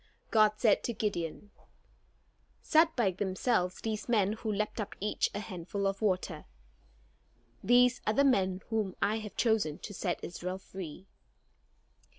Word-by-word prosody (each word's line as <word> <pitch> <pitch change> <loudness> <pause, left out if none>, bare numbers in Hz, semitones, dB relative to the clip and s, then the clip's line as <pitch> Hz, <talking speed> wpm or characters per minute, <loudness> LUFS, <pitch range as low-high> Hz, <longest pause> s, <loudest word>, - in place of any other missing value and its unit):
God 215 -1 +5
said 210 -1 +3
to 235 - -1
Gideon: 205 -2 -3 1.1
"Set 320 +1 +3
by 225 -6 +2
themselves 185 0 0
these 220 +1 -3
men 210 -3 +3
who 220 0 -3
lapped 210 +2 -2
up 205 - -6
each 210 +2 0
a - - -1
handful 200 0 -4
of 195 +1 -1
water. 185 -6 -1 1.2
These 245 +1 +4
are 215 - +3
the 280 - +4
men 190 -7 +2
whom 215 -4 -1
I 215 +2 +1
have 210 -2 -8
chosen 220 -10 +2
to 205 - -8
set 180 -2 -3
Israel 180 +2 -4
free." 190 -2 -9
205 Hz, 145 wpm, -31 LUFS, 185-220 Hz, 1.2 s, God